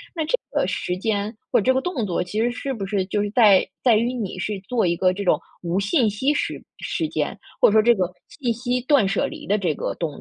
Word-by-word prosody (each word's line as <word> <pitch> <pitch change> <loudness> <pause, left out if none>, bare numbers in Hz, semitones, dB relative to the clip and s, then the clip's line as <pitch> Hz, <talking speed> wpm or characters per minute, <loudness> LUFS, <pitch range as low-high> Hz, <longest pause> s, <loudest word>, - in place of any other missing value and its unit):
那 320 - -1
这 - - +1
个 - - +1
时 180 - -2
间 205 +1 -1 0.2
或 - - +4
者 - - -4
这 260 - +4
个 260 - +2
动 325 -11 -2
作 180 -3 -1
其 205 +5 -4
实 240 +1 +1
是 270 +2 -4
不 200 -5 -4
是 195 -1 -1
就 205 +2 -1
是 205 - -2
在 210 -5 +6 0.2
在 240 -4 +5
于 235 +3 +1
你 215 -7 -4
是 200 +1 -3
做 240 -5 +1
一 170 - +2
个 185 +1 +2
这 200 +2 -4
种 180 - +3 0.2
无 175 +2 -1
信 215 +3 +2
息 260 +8 0
时 295 - -2 0.2
时 330 -4 -2
间， - - -2 0.2
或 - - +7
者 - - 0
说 220 +1 +6
这 235 +1 +5
个 185 -2 -1 0.2
信 250 -6 -2
息 245 +2 -1
断 260 -5 +3
舍 195 +1 0
离 - - -9
的 205 - +2
这 180 -6 0
个 - - -3
动 165 -3 -3
215 Hz, 280 characters per minute, -23 LUFS, 195-250 Hz, 0.2 s, 或